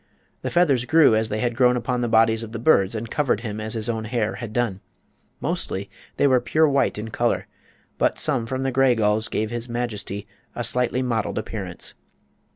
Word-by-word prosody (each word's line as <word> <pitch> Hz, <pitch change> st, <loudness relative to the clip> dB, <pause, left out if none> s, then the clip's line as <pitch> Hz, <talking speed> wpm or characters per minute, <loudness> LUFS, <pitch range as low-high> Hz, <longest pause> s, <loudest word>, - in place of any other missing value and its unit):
The -, -, -2 dB
feathers 145 Hz, -8 st, +3 dB
grew 160 Hz, -6 st, +5 dB
as 110 Hz, 0 st, 0 dB
they 110 Hz, 0 st, -2 dB
had 120 Hz, -1 st, 0 dB
grown 125 Hz, 0 st, +4 dB
upon 125 Hz, +1 st, -1 dB
the 120 Hz, -, 0 dB
bodies 110 Hz, 0 st, +4 dB
of 115 Hz, -1 st, -8 dB
the -, -, -3 dB
birds 110 Hz, -5 st, +3 dB
and 110 Hz, +1 st, -5 dB
covered 135 Hz, -7 st, +1 dB
him 110 Hz, -2 st, -5 dB
as 110 Hz, +1 st, -3 dB
his 110 Hz, 0 st, -1 dB
own 110 Hz, -2 st, -2 dB
hair 110 Hz, -1 st, -1 dB
had 115 Hz, -3 st, -6 dB
done. 110 Hz, -4 st, -1 dB, 0.6 s
Mostly 100 Hz, +1 st, -3 dB, 0.3 s
they -, -, +3 dB
were 130 Hz, -3 st, +4 dB
pure 155 Hz, +6 st, +3 dB
white 140 Hz, -5 st, +1 dB
in 110 Hz, +1 st, -5 dB
color, 120 Hz, +1 st, 0 dB, 0.5 s
but -, -, +2 dB
some 120 Hz, -4 st, 0 dB
from 130 Hz, +2 st, -2 dB
the 135 Hz, -, 0 dB
gray 130 Hz, -1 st, +4 dB
gulls 110 Hz, 0 st, +1 dB
gave 110 Hz, +1 st, -2 dB
his 120 Hz, +1 st, -4 dB
majesty 110 Hz, -4 st, -4 dB, 0.3 s
a 120 Hz, -, -2 dB
slight 120 Hz, +2 st, 0 dB
mottled 115 Hz, -4 st, -1 dB
appearance. -, -, -5 dB
115 Hz, 200 wpm, -23 LUFS, 110-125 Hz, 0.6 s, grew